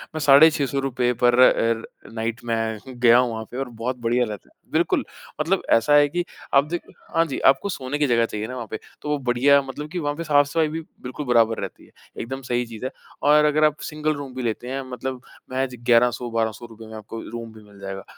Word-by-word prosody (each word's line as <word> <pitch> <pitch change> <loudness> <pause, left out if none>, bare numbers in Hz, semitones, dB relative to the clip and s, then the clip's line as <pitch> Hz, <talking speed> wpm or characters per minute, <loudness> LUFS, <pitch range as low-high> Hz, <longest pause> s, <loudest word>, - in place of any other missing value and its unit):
मैं - - -2
साढ़े 145 +2 +7
₹600 140 -2 -1
रुपए 125 -2 0
पर 120 0 +5
अ, 115 -2 +2
नाईट 115 +1 -3
मैं 115 -1 -1 0.2
गया 120 -1 +6
हूँ 125 -1 +2
वहाँ 110 0 -4
पे 125 - -6
और 135 -1 -3
बहुत 120 +2 -4
बढ़िया 120 +1 +2
रहता 105 -3 -8
है। - - -36
बिल्कुल, - - +1 0.4
मतलब - - +1
ऐसा 115 +6 +3
है 145 0 +6
कि 175 +4 -1 0.3
आप 140 0 +6
देख 175 +1 -2 0.3
हाँ 165 0 +4
जी, 140 -5 -4
आपको 135 +9 +3
सोने 140 -5 -3
की 150 - +2
जगह 115 -2 +3
चाहिए 110 -1 -5
ना 125 - -6
वहाँ 120 -3 -6
पे, 110 - -4 0.2
तो 150 - -5
वो 150 - +1
बढ़िया 135 +2 +4
मतलब 140 +3 -7
कि 180 - -3
वहाँ 145 -2 -2
पे 165 - -5
साफ़-सफ़ाई 150 +1 +3
भी 160 +2 -4 0.2
बिल्कुल 130 +4 -6
बराबर 115 -2 +3
रहती 95 - -7
है, - - -23 0.3
एकदम 135 +3 -5
सही 125 -1 -1
चीज़ 115 +1 -8
है। - - -3 0.3
और 150 +1 +5
अगर 150 +1 +2
आप 150 0 +1
सिंगल 155 0 -1
रूम 140 -2 -7
भी 130 - -4
लेते 115 +1 -3
हैं 135 +1 -2
मतलब 130 0 -5 0.3
महज़ 130 -1 -2
₹1100, 120 0 +3
₹1200 115 0 -3
में 110 - -10
आपको 110 +1 -8
रूम 115 0 -7
भी 110 -1 -14
मिल 100 -1 -18
जाएगा। 95 0 -6
125 Hz, 230 wpm, -23 LUFS, 115-145 Hz, 0.4 s, साढ़े